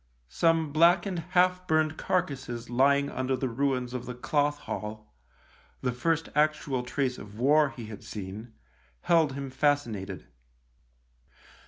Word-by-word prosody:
Some 165 - +2
blackened 175 +3 +4 0.2
half 180 0 +3
burned 155 0 +2
carcases 130 -11 -2
lying 140 +3 +3
under 130 +1 -1
the 130 - -1
ruins 125 0 -1
of 125 -1 -5
the 125 - -5
Cloth 145 +3 0
Hall 105 - -6 0.3
— - - -31
the 125 - +1
first 160 +6 0
actual 150 -3 +1
trace 125 +1 -2
of 105 0 -11
war 145 +4 +4
he 120 -4 -9
had 105 -2 -9
seen 105 +3 -7 0.3
— - - -35
held 160 -5 +4
him 140 -1 -5
fascinated. 120 -10 -1
135 Hz, 140 wpm, -28 LUFS, 120-155 Hz, 0.3 s, blackened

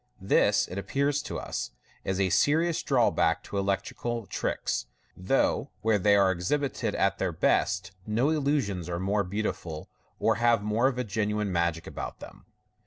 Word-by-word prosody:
This, 95 - +3
it 90 - -5
appears 140 +8 0
to - - -5
us, - - -4 0.3
is 95 0 -2
a 95 -2 +2
seri 160 +4 +3
ous 165 - -1
drawback - - +2
to 100 - -5
electri 100 0 -1
cal 120 -2 -2
tricks, - - -2 0.3
though 135 +7 +1
where 110 -2 +2
they 100 +2 +4
are 100 -2 +4
exhibited 130 +11 -1
at - - +1
their - - 0
best 95 0 +1 0.2
no 120 +8 +2
illusions 135 - 0
are 85 0 -2
more 100 +2 +1
beautiful, 90 -5 -4 0.3
or 110 -2 +2
have 120 -3 +4
more 110 +4 +2
of 125 -2 -1
genuine 105 -1 -1
magic 85 -2 0
about - - -6
them. - - -12
105 Hz, 165 wpm, -28 LUFS, 95-125 Hz, 0.3 s, they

